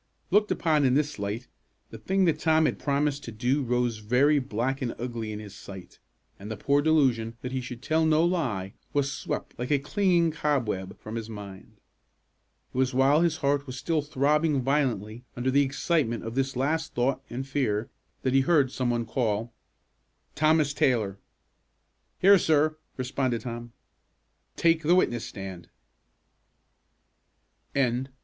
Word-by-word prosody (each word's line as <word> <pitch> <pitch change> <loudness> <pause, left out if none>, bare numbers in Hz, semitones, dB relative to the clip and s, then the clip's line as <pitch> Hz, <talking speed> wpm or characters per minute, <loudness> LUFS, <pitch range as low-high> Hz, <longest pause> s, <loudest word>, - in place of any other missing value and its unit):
Looked 210 +2 +4
upon 155 -3 +2
in 130 -1 +3
this 150 -3 0
light, 105 +5 -3 0.5
the 115 - -9
thing 190 - +1
that 155 -3 +1
Tom 160 -1 +3
had - - -1
promised 145 0 0
to 115 - -6
do 125 +6 0
rose 120 -3 0
very 130 +7 +3
black 130 +2 -2
and 120 -3 -2
ugly 115 -3 -4
in 105 - -5
his 105 -2 -9
sight; 95 -2 -11 0.4
and 100 +2 -8
the 110 - -4
poor 140 +7 +2
delusion 130 -7 +2
that 125 - -5
he 130 0 -2
should 125 0 -8
tell 160 +2 +2
no 160 +1 +4
lie 120 - -1 0.2
was 140 -1 +1
swept, - - -4
like 125 - -3
a 145 - +4
clinging 170 +2 +2
cobweb, 120 -12 -2
from 110 - -8
his 115 -1 -6
mind. 100 -3 -9 1.0
It - - -6
was 130 -1 +1
while 135 +4 +4
his 170 -2 +2
heart 140 0 +1
was 130 0 -6
still 155 +3 0
throbbing 145 0 +1
violently 120 -5 -1
under 125 +2 0
the 140 +2 +4
excitement 140 -3 0
of 115 - -5
this 135 +1 -1
last 160 +5 -1
thought 125 +3 +1
and 130 +3 -5
fear, 115 -6 -1 0.3
that 130 - +1
he 135 - +5
heard 140 -3 +3
some 130 -2 -1
one 120 -1 0
call, 115 -1 -1 0.8
"Thomas 155 -1 +3
Taylor!" 110 -9 +1 1.0
"Here, 195 +1 +6
sir," 155 -1 +2 0.2
responded 130 -2 -1
Tom. 120 -1 -6 0.8
"Take 165 -1 +3
the 165 +3 +4
witness 120 -10 +1
stand." 95 -3 -8
130 Hz, 155 wpm, -27 LUFS, 115-150 Hz, 1.0 s, Here